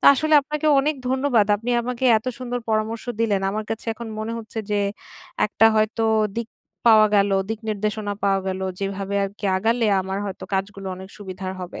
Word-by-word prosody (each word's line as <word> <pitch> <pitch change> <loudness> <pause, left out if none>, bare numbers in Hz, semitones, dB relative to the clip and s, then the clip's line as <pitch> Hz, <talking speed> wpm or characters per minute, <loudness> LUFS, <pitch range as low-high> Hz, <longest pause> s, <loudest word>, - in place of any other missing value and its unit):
তো - - -5
আসলে 310 +3 +2
আপনাকে 300 +2 -3
অনেক 300 +2 0
ধন্যবাদ। 260 -5 +2
আপনি 235 +4 -4
আমাকে 250 +1 -3
এত 220 - -21
সুন্দর 245 -1 -3
পরামর্শ 220 +1 -1 0.2
দিলেন। 205 -4 +2
আমার 215 +2 -3
কাছে 225 +1 -4
এখন 230 0 -7
মনে 220 +1 -3
হচ্ছে 225 0 -8
যে 205 - +2 0.7
একটা 225 +2 +4
হয়তো 220 +1 +1 0.3
দিক 235 -1 -3 0.4
পাওয়া 215 -1 +8
গেল, 200 0 +3 0.2
দিক 225 0 -3
নির্দেশনা 210 0 -2
পাওয়া 195 -1 +3
গেল। 190 0 -3 0.2
যেভাবে 195 0 -3
আরকি 200 +1 -5
আগালে 225 +3 +1
আমার 190 +1 -3
হয়তো 195 - -6
কাজগুলো 195 0 -3
অনেক 190 +1 -10
সুবিধার 190 -2 -6
হবে। 180 - -7
215 Hz, 180 wpm, -23 LUFS, 195-235 Hz, 0.7 s, পাওয়া